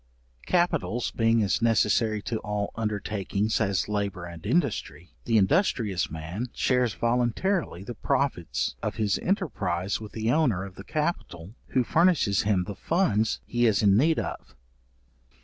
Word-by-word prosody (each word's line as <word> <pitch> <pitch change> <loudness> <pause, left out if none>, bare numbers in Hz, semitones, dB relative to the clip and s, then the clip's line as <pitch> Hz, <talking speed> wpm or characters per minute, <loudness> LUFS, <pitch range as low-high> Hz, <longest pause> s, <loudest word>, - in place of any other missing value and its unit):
Capitals 125 - +1
being 115 -1 +2
as 100 +3 0
necessary 110 -1 +2
to 115 - -2
all 105 -1 -3
undertakings 105 0 -1
as 100 -3 0
labour 100 -4 -2
and 85 -1 -10
industry, 125 - -1
the 115 -1 +3
industrious 110 - +1
man 80 +10 -5
shares 125 -4 +1
voluntarily 120 - 0
the 120 - -6
profit 90 - -1
of - - -3
his 105 -3 0
enterprize 105 - -1
with 110 - -9
the 110 +1 0
owner 125 - +2
of 95 - -10
the 95 - -10
capital 110 - -3
who 130 - +1
furnishes 155 - +3
him 100 -3 +1
the 100 - -6
funds 110 - +1
he 120 0 +1
is 110 -1 +2
in 100 -1 +5
need 155 +8 +3
of. - - -5
110 Hz, 145 wpm, -26 LUFS, 100-125 Hz, -, in